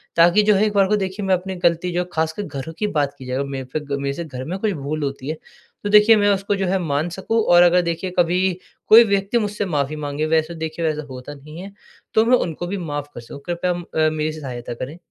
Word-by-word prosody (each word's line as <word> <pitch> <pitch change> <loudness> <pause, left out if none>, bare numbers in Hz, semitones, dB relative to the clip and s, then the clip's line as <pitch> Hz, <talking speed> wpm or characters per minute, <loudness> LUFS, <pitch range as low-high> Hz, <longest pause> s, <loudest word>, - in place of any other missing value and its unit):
ताकि 175 +5 +5
जो 210 0 +4
है, 205 +2 +3
एक 210 - -1
बार 195 -1 +4
को 210 - +2
देखिए, 195 +1 -3
मैं 190 - +2
अपनी 185 +1 -5
गलती 170 +1 +2
जो 175 - 0
है, 180 - -5
खासकर 160 +5 -1
घरों 150 -1 -6
की 210 - 0
बात 145 -6 0
की 130 - -10
जाए, 125 0 -3
अगर 140 - -1
मेरे 135 -1 -5
पे 155 - 0
ग 145 -1 -4
मेरे 140 0 -1
से 170 - -5
घर 130 -4 -7
में 180 +4 -4
कुछ 215 0 0
भूल 150 0 -4
होती 135 -1 -4
है, 155 - -2 0.5
तो 205 - -2
देखिए, 210 +2 +7
मैं 205 -1 +3
उसको 200 +1 -1
जो 195 -1 -1
है, 190 +1 +1
मान 155 0 -1
सकूँ 210 +6 -1
और 175 -2 +6
अगर 175 +1 +5
देखिए, 170 +2 -3
कभी 175 +1 +3 0.5
कोई 230 +2 +9
व्यक्ति 200 +2 +1
मुझसे 210 -2 -1
माफ़ी 150 -3 -1
माँगे, 145 0 -3
वैसे 160 +1 +1
देखिए 160 +1 -4
वैसा 155 -1 -1
होता 130 +2 -8
नहीं 150 +4 -12
है, 195 +1 -9 0.4
तो 220 - +4
मैं 250 +2 +5
उनको 175 +1 -3
भी 200 - -3
माफ़ 145 -5 -4
कर - - -7
सकूँ। 120 +4 -10
कृपया 175 +1 -1
म 175 - -6
अ, 155 0 +3
मेरी 155 0 -1
सी 155 - -8
सहायता 120 -3 -6
करें। 130 +7 -7
170 Hz, 265 wpm, -21 LUFS, 150-195 Hz, 0.5 s, कोई